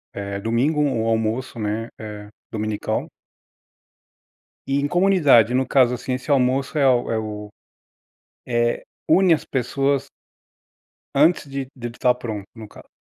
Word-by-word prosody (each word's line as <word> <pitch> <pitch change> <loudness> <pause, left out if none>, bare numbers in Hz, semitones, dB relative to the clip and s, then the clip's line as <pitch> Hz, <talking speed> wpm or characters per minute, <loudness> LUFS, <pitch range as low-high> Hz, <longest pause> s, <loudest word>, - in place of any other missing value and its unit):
eh, 100 0 -4
domingo, 125 +8 +1
um 125 -6 0
almoço, 115 +3 -1
né, 110 +2 -2
eh, 105 -1 -8 0.2
dominical. 110 -1 -2 1.6
E 135 +1 +1
em 145 - 0
comunidade, 155 - +4
no 130 +1 +1
caso 125 -3 +4
assim, 125 +1 -3
esse 130 +3 -3
almoço 135 +2 +1
é 140 -2 +4
o 120 -2 +1
é 110 - 0
o 105 -1 -6 1.0
é, 120 -1 0 0.3
une 185 -2 +5
as 155 - -4
pessoas 135 +2 -1 1.1
antes 155 +1 +4
de 135 -1 -4
dele 120 -2 -7
tá 125 -1 +3
pronto, 110 -5 -6
no 110 -2 -10
caso. - - -15
125 Hz, 140 wpm, -22 LUFS, 110-140 Hz, 1.6 s, une